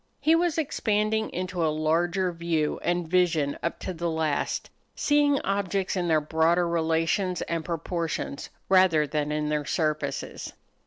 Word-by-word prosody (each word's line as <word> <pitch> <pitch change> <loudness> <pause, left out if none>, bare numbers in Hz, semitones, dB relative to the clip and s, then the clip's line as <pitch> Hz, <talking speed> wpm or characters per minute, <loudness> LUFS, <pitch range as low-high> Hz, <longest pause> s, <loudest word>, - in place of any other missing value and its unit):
He 315 - +3
was 335 -1 +2
expanding 220 -7 0
into 180 -1 -3
a 160 - +3
larger 170 +4 +1
view 165 -3 -1
and 175 -1 -1
vision 165 -5 +2
up 170 - -2
to 185 - -4
the 170 0 -2
last 160 -3 -1 0.2
seeing 290 -1 +3
objects 195 -1 -1
in 180 -2 -1
their 160 -2 +4
broader 160 +3 +2
relations 165 +3 0
and 165 -1 -3
proportions 165 -3 -3 0.2
rather 185 -5 +5
than 150 0 -2
in 150 0 -1
their 150 -1 0
surfaces. 155 -1 -2
170 Hz, 145 wpm, -26 LUFS, 160-185 Hz, 0.2 s, rather